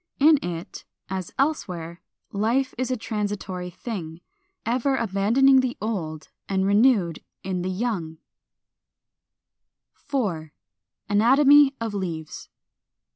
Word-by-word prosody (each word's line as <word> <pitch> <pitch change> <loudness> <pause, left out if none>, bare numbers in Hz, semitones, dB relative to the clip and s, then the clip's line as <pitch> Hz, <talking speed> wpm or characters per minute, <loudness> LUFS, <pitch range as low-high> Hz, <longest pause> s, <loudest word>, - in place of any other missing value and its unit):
In 300 +1 +6
it, 170 -1 -6 0.3
as 190 -2 -4
elsewhere, 180 - -2 0.3
life 235 +6 0
is 255 +1 -2
a 255 - 0
transitory 205 -5 -4
thing, 175 -5 -6 0.5
ever 255 +4 +1
abandoning 230 +5 +4
the 255 -1 -1
old, 160 -8 -4 0.2
and 190 -1 +1
renewed 200 -5 +3 0.2
in 185 -2 -2
the 185 - -2
young. 185 -5 -2
§ - - -22 1.8
4. 190 - -3 0.6
ANATOMY 275 +6 +5
OF 225 -2 -3
LEAVES. 170 -6 -5
205 Hz, 105 wpm, -24 LUFS, 180-255 Hz, 1.8 s, In